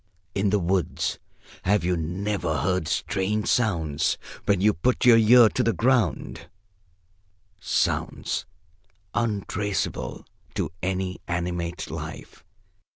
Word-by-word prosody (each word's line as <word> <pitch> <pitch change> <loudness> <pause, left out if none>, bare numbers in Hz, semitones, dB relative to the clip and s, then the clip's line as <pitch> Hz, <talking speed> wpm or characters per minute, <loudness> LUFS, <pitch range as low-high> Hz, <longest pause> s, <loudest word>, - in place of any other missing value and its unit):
In 100 0 +1
the 105 - +3
woods, 90 -2 -1 0.4
have 100 +1 +2
you 90 +1 +1
never 90 0 -2
heard 90 -3 0
strange 105 +2 -1
sounds, 85 -11 +1 0.3
when 100 -2 +3
you 105 +2 +4
put 120 +10 0
your 120 -2 +8
ear 115 +1 +7
to - - -1
the 115 - +2
ground 115 - 0 1.1
sounds - - -1 0.7
untraceable 105 - -2 0.3
to - - -1
any 95 0 -2
animate 90 0 -3
life? - - -8
95 Hz, 105 wpm, -25 LUFS, 85-105 Hz, 1.1 s, your